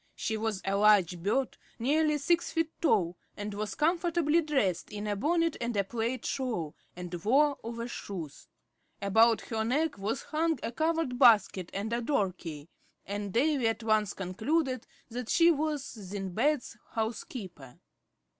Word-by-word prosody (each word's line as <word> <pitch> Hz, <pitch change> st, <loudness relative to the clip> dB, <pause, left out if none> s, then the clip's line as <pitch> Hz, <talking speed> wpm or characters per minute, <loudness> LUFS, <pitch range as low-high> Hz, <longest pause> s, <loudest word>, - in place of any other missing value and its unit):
She 220 Hz, -, -2 dB
was 215 Hz, -3 st, -2 dB
a 195 Hz, 0 st, +1 dB
large 200 Hz, -4 st, +4 dB
bird, 245 Hz, +8 st, 0 dB, 0.2 s
nearly 300 Hz, +5 st, +2 dB
six 340 Hz, +4 st, +1 dB
feet 325 Hz, -1 st, 0 dB
tall, 175 Hz, -, +2 dB, 0.2 s
and 205 Hz, 0 st, -4 dB
was 210 Hz, +1 st, -4 dB
comfortably 335 Hz, 0 st, +2 dB
dressed, 265 Hz, -, 0 dB
in 210 Hz, 0 st, -5 dB
a 205 Hz, -1 st, -1 dB
bonnet 330 Hz, -, +1 dB
and 235 Hz, -2 st, -2 dB
a 200 Hz, -, +3 dB
plaid 235 Hz, +5 st, -3 dB
shawl, 220 Hz, -, -2 dB, 0.2 s
and 180 Hz, 0 st, -7 dB
wore 280 Hz, +5 st, +3 dB
overshoes. 225 Hz, -, -6 dB, 0.5 s
About 220 Hz, +3 st, +4 dB
her 220 Hz, -1 st, -2 dB
neck 280 Hz, +1 st, 0 dB
was 215 Hz, +7 st, -2 dB
hung 320 Hz, 0 st, 0 dB
a -, -, -2 dB
covered 315 Hz, -3 st, 0 dB
basket 205 Hz, -7 st, +5 dB
and 205 Hz, +4 st, -3 dB
a 235 Hz, -, 0 dB
door 210 Hz, -8 st, +1 dB
key; 155 Hz, -4 st, -8 dB, 0.4 s
and 205 Hz, 0 st, -4 dB
Davy 265 Hz, +2 st, +2 dB
at 225 Hz, +1 st, -1 dB
once 215 Hz, -2 st, +2 dB
concluded 255 Hz, -, -1 dB, 0.2 s
that 245 Hz, 0 st, -5 dB
she 340 Hz, 0 st, +6 dB
was 305 Hz, -2 st, -1 dB
Sindbad's 215 Hz, +5 st, -2 dB, 0.2 s
house 220 Hz, 0 st, -2 dB
keeper. 175 Hz, -, -9 dB
230 Hz, 150 wpm, -30 LUFS, 200-295 Hz, 0.5 s, she